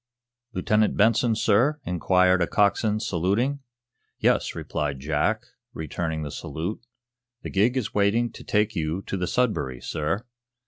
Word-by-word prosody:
"Lieutenant 105 +2 +1
Benson, 115 +2 +3
sir?" 120 +9 +2
inquired 90 +1 +3
a 85 - +2
coxswain, 105 +2 +2
saluting. 110 +7 0 0.6
"Yes," - - +1
replied 70 -3 -3
Jack, 75 +3 0 0.3
returning 80 0 -3
the 75 - -5
salute. 85 +7 -5 0.6
"The - - -5
gig 110 +6 +2
is 125 - -2
waiting 105 +4 +2
to - - -11
take 105 +1 +1
you 80 +3 -2
to - - -4
the 90 -2 -2
'Sudbury' 105 - 0
sir." 80 - -2
100 Hz, 135 wpm, -25 LUFS, 80-110 Hz, 0.6 s, Benson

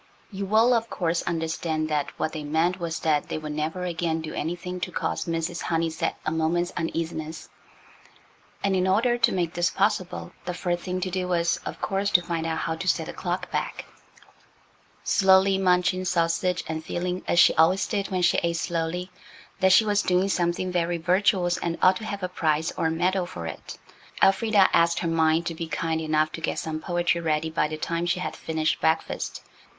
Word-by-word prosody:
You 195 0 -4
will, 225 +4 +4
of 230 -1 0
course, 170 -2 -1
understand 160 -1 -1
that 150 -2 0
what 155 - -1
they 155 -2 -5
meant 165 +5 0
was 165 -2 -3
that 150 -2 +1
they - - -2
would 155 -1 -5
never 155 +4 -3
again 165 -2 -1
do 160 -1 -6
anything 175 +3 -4
to 180 - -4
cause - - -2
Mrs. 165 +1 -2
Honeysett 165 -1 -1
a 155 - 0
moment's 165 +2 0
uneasiness, 165 -1 -4 1.1
and 195 -1 +2
in 185 0 +1
order 235 +6 +2
to - - +4
make 175 -3 -1
this 175 0 +1
possible 195 -2 -1
the 180 - -3
first 175 -1 -2
thing 185 0 -2
to 185 0 -2
do 185 0 -2
was, 170 -1 +1
of - - -6
course, 200 0 0
to 175 - +4
find 165 -1 -2
out 160 0 -1
how 160 - -2
to 185 - -5
set - - +2
the - - -7
clock - - -3
back. - - -3 1.2
Slowly 190 0 +4
munching 185 0 +2
sausage, 175 +1 +1
and 160 0 -4
feeling, 180 +2 -3
as - - +1
she 175 - +7
always 180 +4 +3
did 200 -3 -2
when 185 -1 -1
she 175 - +4
ate 170 0 0
slowly, 175 +2 -2 0.5
that 190 0 +4
she 220 +4 +6
was 205 -1 +2
doing 185 +1 +1
something 175 0 0
very 175 -1 0
virtuous 180 +1 +2
and 170 -1 -3
ought 185 0 +5
to 220 - -8
have 200 -3 -5
a - - +1
prize 160 -3 0
or 165 - 0
a - - +1
medal 180 +3 0
for 85 - -7
it, 80 - -7 0.5
Elfrida 200 0 +5
asked 170 0 +4
her 170 - -1
mind 165 0 +2
to 165 - -2
be 165 0 -5
kind 160 0 -1
enough 155 0 +1
to 165 - -7
get - - -2
some 155 -1 -3
poetry 175 0 0
ready 160 0 0
by 155 - +1
the 155 0 -5
time 170 +2 -2
she 180 +1 0
had - - -4
finished 155 -1 -1
breakfast. 160 0 -1
175 Hz, 200 wpm, -25 LUFS, 160-185 Hz, 1.2 s, she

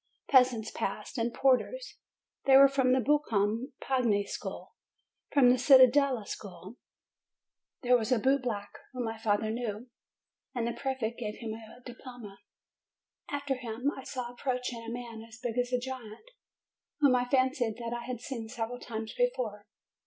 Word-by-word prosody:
Peasants 250 -5 +4
passed, 210 +5 -4
and 230 +1 0
porters; 275 - +1 0.5
they 270 -1 +8
were 275 0 +9
from 265 -2 +2
the 260 - +4
Buoncom 240 -3 +1
pagni 235 -6 +1
School. - - -6 0.6
From 255 -4 +6
the 255 - +3
Cittadella 260 -2 +6
School 190 +3 -8 1.1
there 250 0 +5
was 235 0 0
a 250 - +5
bootblack 240 -4 0 0.2
whom 250 -1 -3
my 225 0 -4
father 215 -1 +1
knew, 235 0 -4 0.6
and 240 -2 0
the 235 - -1
prefect 255 -4 -3
gave 210 -3 -4
him 225 -2 -5
a 225 +2 -12
diploma. 245 -5 -10 0.9
After 285 -1 -1
him 250 +2 -2
I 265 - -8
saw 250 -3 -5
approaching 250 -2 -3
a 230 - -7
man 235 -2 -6
as 225 0 -13
big 240 -1 -4
as 245 0 0
a 250 - +3
giant, 255 - -8 0.7
whom 280 -4 +5
I 245 0 +2
fancied 255 -4 +2
that 235 -1 -4
I 240 - -5
had 250 -2 -5
seen 235 -4 -6
several 240 +1 -4
times 220 -2 -6
before. 235 - -1
245 Hz, 155 wpm, -30 LUFS, 225-260 Hz, 1.1 s, were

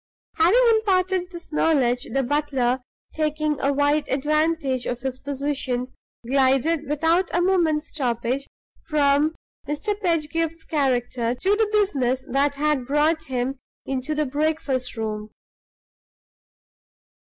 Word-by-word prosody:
Having 365 +10 +5
imparted 375 -4 +1
this 345 -2 -11
information, 255 -6 +1
the 270 0 +1
butler, 265 -2 0 0.3
taking 305 -1 -1
a 280 - +2
wise 290 +2 +2
advantage 295 -1 0
of 245 0 -3
his 260 -1 -4
position, 270 -3 -2 0.3
glided, 275 +4 +2
without 325 +5 +2
a - - +3
moment's 340 -4 +2
stoppage, 250 -1 -1 0.4
from 295 +1 +2 0.3
Mr. 300 +9 -1
Pedgift's 330 -2 -1
character 245 -4 0
to 380 +11 +1
the 435 0 +1
business 270 - +1
that 280 +2 +1
had 290 -3 0
brought 305 +3 +2
him 255 +1 -2 0.3
into 270 +3 -2
the 305 0 +1
breakfast 285 -3 -1
room. 215 -1 -4
290 Hz, 115 wpm, -23 LUFS, 260-320 Hz, 0.4 s, Having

